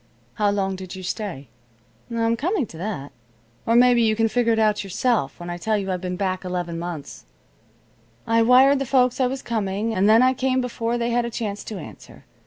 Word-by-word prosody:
"How 205 -1 +1
long 195 -1 -1
did 185 0 -8
you 185 - -8
stay?" 180 - -5 0.6
"I'm 230 -1 0
coming 320 - -1
to 165 - -13
that. 175 -8 -5 0.6
Or 230 - +3
maybe 245 0 +5
you 220 -1 +3
can 225 +1 +2
figure 235 +1 +1
it - - 0
out 215 -1 +2
yourself 195 - -1
when 175 - -8
I 175 - -5
tell 215 +4 0
you 195 -2 -3
I've 180 -1 -3
been 180 -1 -3
back 185 0 -2
eleven 175 -2 -3
months. 170 -4 -7 1.0
I 230 0 +3
wired 260 +4 +6
the 275 - -3
folks 255 -1 +2
I 255 - +3
was 265 +1 -5
coming, 215 -1 -2
and 200 +1 +2
then 225 +3 +6
I 255 0 +4
came 260 0 0
before 240 -1 -2
they 235 0 -1
had 240 0 +1
a - - -3
chance 210 -3 -4
to 215 - -6
answer. 110 - -12
220 Hz, 210 wpm, -23 LUFS, 185-240 Hz, 1.0 s, wired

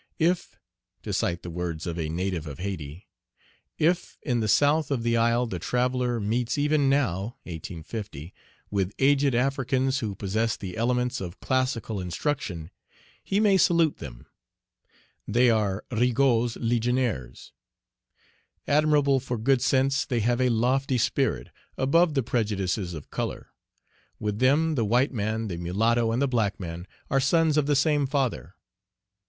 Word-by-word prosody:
"If" 170 +2 0 0.5
to - - -4
cite 85 0 -1
the 85 - -6
words 85 -2 -4
of 85 -1 -4
a 80 -2 -2
native 85 -1 -2
of 70 - -7
Hayti, 90 -3 -6 0.7
"if 175 +3 0
in 125 -5 0
the 110 - 0
south 145 +8 +3
of 130 -5 -1
the 115 0 +1
isle 115 +1 +2
the 95 -7 -5
traveller 125 +3 0
meets 115 +5 -1
even 145 -1 +2
now 120 -4 0
(1850) 85 0 -7 0.4
with 100 -1 -1
aged 140 -1 +3
Africans 130 +1 +1
who 105 -5 -3
possess 110 +4 -1
the 95 -3 -7
elements 125 +2 0
of 90 0 -7
classical 130 -5 -1
instruction, 90 - -3 0.5
he 195 - 0
may 205 -3 +4
salute 170 -4 +3
them; - - -10 1.0
they 120 +3 +4
are 105 -3 0
Rigaud's 120 0 +2
legionaries. 120 - -1 1.2
Admirable 145 -2 +3
for 125 -1 -4
good 125 +3 +2
sense, 135 +1 +2
they 120 -3 -1
have 120 +3 +1
a 125 - +3
lofty 125 +3 +1
spirit, 115 - 0 0.3
above 155 +4 +3
the 135 - +2
prejudices 100 -5 -1
of 75 - -10
color; - - -4 0.7
with 105 -1 -2
them, 150 +5 +3
the 125 -6 0
white 125 +7 +2
man, 110 0 -2
the 90 -4 -4
mulatto, 115 +7 +1
and 115 - 0
the - - +2
black 115 -6 0
man, 85 0 -6 0.2
are 135 - +3
sons 155 +3 +3
of 150 -2 +2
the 145 - +3
same 145 0 +2
Father. 130 - -2
120 Hz, 150 wpm, -26 LUFS, 100-135 Hz, 1.2 s, may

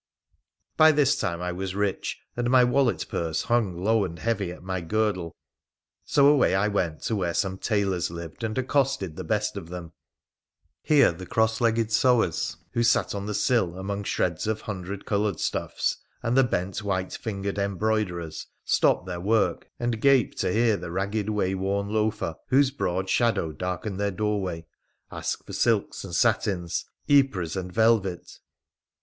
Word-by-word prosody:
15y 155 -1 +7
this 145 -1 +4
time 85 -9 -2
I 90 - -1
was 95 +1 -4
rich, 100 -1 -2
and 120 0 -1
my 125 0 +6
wallet 125 0 +2
purse 80 -2 -2
hung 100 -7 0
low 110 0 +3
and 85 -3 -5
heavy 100 -2 -1
at 90 - -11
my 95 -1 -3
girdle, 95 -2 -1 0.7
so 140 -1 +3
away 145 -8 +5
I 100 +2 +2
went 90 -6 -1
to 110 - -1
where 90 -4 -1
some 95 -2 -1
tailors 100 -5 0
lived, 85 +4 -8
and 110 +1 -2
accosted 130 - 0
the - - -5
best - - -1
of 80 - -7
them. 85 -2 -7 0.9
Here 145 - +5
the 90 +2 -9
cross 110 +1 +1
legged 115 -1 +2
sewers 115 -7 +2
who 115 - 0
sat 120 - +2
on 100 0 -4
the 105 - -2
sill 95 -9 +1
among 100 +1 -4
shreds 85 0 -1
of 110 -1 -1
hundred 100 -1 -6
coloured 105 -3 0
stuffs - - -1 0.3
and 115 +2 0
the 135 - +6
bent 95 -3 -2
white 95 -2 -2
fingered 100 -2 -4
embroiderers 100 -5 -1 0.2
stopped - - +2
their 90 -1 -5
work 110 +3 +1
and 120 -2 -1
gaped 135 -3 +3
to - - +1
hear 110 0 +3
the 85 - -7
ragged, 100 +4 -2
wayworn 100 0 -1
loafer, 110 -5 0
whose 135 +1 +4
broad 95 -8 -2
shadow 115 -7 +1
darkened 90 +5 -4
their 100 0 +1
doorway, 95 -4 -2 0.5
ask - - -4
for - - -9
silks 115 -4 +1
and 90 -4 -6
satins, 100 -7 +1 0.2
yepres 135 - +2
and 90 -1 -4
velvet. 110 -4 +1
100 Hz, 165 wpm, -26 LUFS, 90-115 Hz, 0.9 s, 15y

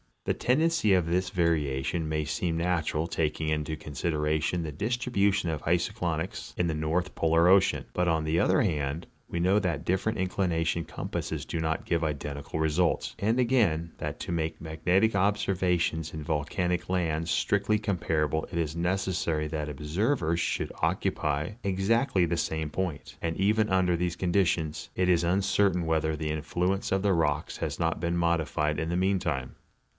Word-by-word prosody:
The - - 0
tendency 155 -4 +2
of 90 -3 +2
this 90 +2 0
variation 80 -3 0
may 75 -1 -1
seem 80 +2 -1
natural, 85 -2 0
taking 80 -1 -1
into 75 0 -1
consideration 75 +3 -1
the 80 - -4
distribution 100 - 0
of 80 -2 -3
iso 85 +1 +1
clynics - - -3
in 90 - +1
the 80 - 0
North 80 +4 -1
Polar 80 +1 +3
ocean; 95 +1 +4
but, 90 0 +1
on 80 -2 +2
the 80 +2 +1
other 95 - +3
hand, 75 -3 -1 0.2
we 85 - -3
know 95 +4 +3
that 85 -7 -2
different 95 +5 0
inclination 85 -3 0
compasses - - -4
do 85 - -3
not 80 0 -1
give 85 -1 0
identical 75 0 -3
results; 80 +2 +1
and 110 +5 +1
again, 105 -11 +2
that - - -5
to - - -4
make 80 -1 -2
magnetic 90 +7 +1
observations 90 -5 +1
in 80 -1 -5
vol 75 -2 -1
canic 90 +1 -1
lands 85 -3 0
strictly 100 +4 +2
comparable 80 -7 0
it - - -3
is 80 -2 -1
necessary 85 -3 0
that 75 -1 -3
observers 85 - 0
should - - -1
occupy 75 +2 0
exactly 100 +1 +2
the 85 0 -1
same 80 -1 -2
point, 85 -2 -4
and 80 -1 -2
even 105 +2 +2
under 95 -2 +3
these 85 0 -1
conditions 85 -4 0
it 90 0 +1
is 85 -1 +4
uncertain 95 0 +2
whether 80 -1 +1
the 75 0 -3
influence 90 +5 -1
of 95 0 +2
the 100 -2 +3
rocks 75 -3 0
has - - -3
not 85 0 0
been 85 +1 -1
modified 80 -3 0
in 80 0 -2
the 85 - 0
meantime. 90 -9 0
85 Hz, 165 wpm, -28 LUFS, 80-95 Hz, 0.2 s, ocean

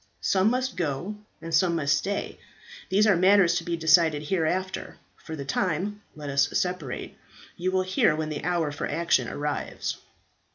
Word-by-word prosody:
Some 190 +2 +3
must 255 -2 -1
go 175 +4 -2 0.3
and 165 0 -6
some 170 +1 +3
must 145 -3 +2
stay; 200 +2 -3 0.5
these 205 +3 +4
are 205 -3 +5
matters 185 0 +5
to - - -3
be 170 -1 -2
decided 160 -2 +4
hereafter; 185 +1 -1 0.2
for 160 - -8
the 140 -2 -6
time 185 +8 -1
let 150 -1 -8
us 140 +1 +3
separate; 180 -8 -3 0.4
you 185 +2 -1
will 185 0 +2
hear 185 -4 +2
when 155 0 -3
the 150 - -5
hour 170 -4 0
for 145 - -4
action 170 +1 +1
arrives." 145 0 -3
170 Hz, 165 wpm, -26 LUFS, 155-185 Hz, 0.5 s, are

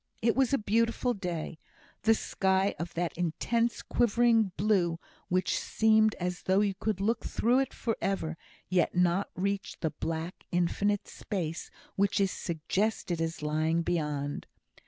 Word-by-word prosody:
It 230 0 +3
was 265 -2 +3
a 275 - +4
beautiful 230 +3 +1
day; 175 -5 -4 0.4
the 225 0 +4
sky 190 -1 +1
of 170 +1 -5
that 170 0 -1
intense 230 +8 0
quivering 235 -3 +3
blue 190 -5 +2 0.3
which 185 +1 +1
seemed 220 -1 +3
as 180 0 -3
though 190 +2 +3
you 205 -2 +1
could 200 0 -2
look 220 +4 0
through 245 +3 +2
it 270 - 0
for 225 -3 -2
ever, 165 -5 -1 0.3
yet 180 -2 +1
not 180 +2 +2
reach 200 +1 -2
the 160 - -1
black, 165 +2 -5
infinite 195 +4 +1
space 170 -6 -4 0.3
which 200 0 +2
is 195 -1 +2
suggested 175 +1 -1
as 165 -1 -3
lying 155 +2 +1
beyond. 150 -4 -2
190 Hz, 145 wpm, -30 LUFS, 170-220 Hz, 0.4 s, a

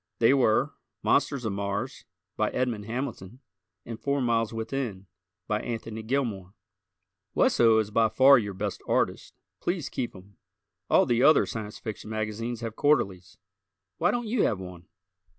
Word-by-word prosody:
They 115 +3 +5
were 120 -6 +2 0.3
"Monsters 135 -4 +1
of 105 - -1
Mars," 100 0 -3 0.3
by - - +1
Edmond 120 -5 -2
Hamilton 120 -2 -5 0.5
and 115 -2 -7
"Four 140 0 0
Miles 115 -3 +1
Within," 115 -4 -4 0.4
by 105 0 0
Anthony 115 -1 -5
Gilmore. 110 -6 -2 0.8
Wesso 115 -2 +4
is 110 -1 0
by 110 +1 +3
far 130 +4 +7
your 100 -3 -4
best 100 +1 -4
artist. - - 0 0.2
Please 175 -5 -2
keep 120 -4 -4
him. 95 +2 -15 0.5
All - - +5
the 120 0 +1
other 155 +4 +6
Science 105 -2 -6
Fiction 110 -1 -7
magazines 110 +2 -3
have 115 -2 -5
quarterlies. 95 -12 +1 0.6
Why - - +3
don't 240 -1 -1
you 220 0 0
have 105 - +1
one? 90 -1 -10
115 Hz, 150 wpm, -27 LUFS, 105-125 Hz, 0.8 s, far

